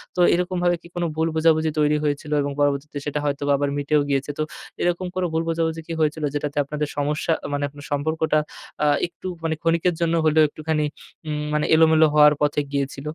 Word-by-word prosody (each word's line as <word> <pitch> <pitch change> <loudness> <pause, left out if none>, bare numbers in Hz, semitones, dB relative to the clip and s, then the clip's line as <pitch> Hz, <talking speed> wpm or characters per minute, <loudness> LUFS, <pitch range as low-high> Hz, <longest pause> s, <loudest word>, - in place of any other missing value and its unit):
তো - - -4
এরকমভাবে 175 0 +1
কি - - -14
কোনো 175 0 -1
ভুল 160 +1 +1
বোঝাবুঝি 160 -1 +3
তৈরি 150 0 +3
হয়েছিল 145 0 -2
এবং 140 0 -2
পরবর্তীতে 145 +1 0
সেটা 150 0 -2
হয়তোবা 145 0 0
আবার 145 0 0
মিটেও 145 +1 +2
গিয়েছে। 140 +1 0
তো 155 - 0 0.4
এরকম 175 +1 0
কোনো 185 - 0
ভুল 160 +1 +1
বোঝাবুঝি 165 0 -1
কি 165 - -4
হয়েছিল 155 0 0
যেটাতে 145 0 -3
আপনাদের 150 +1 -3
সমস্যা 150 +3 0 0.2
মানে 145 - -1
আপনার 145 0 -12
সম্পর্কটা 155 +2 +1 0.4
আ - - +4 0.2
একটু 175 +2 -10 0.2
মানে 160 -1 0
ক্ষণিকের 165 +2 +2
জন্য 170 0 +1
হলেও 155 0 +5
একটুখানি 155 +1 -2 0.4
উম 150 -1 -2
মানে 150 - +1
এলোমেলো 160 0 +5
হওয়ার 150 0 +7
পথে 150 0 +2
গিয়েছিল? 140 -1 -2
150 Hz, 185 wpm, -23 LUFS, 145-165 Hz, 0.4 s, হওয়ার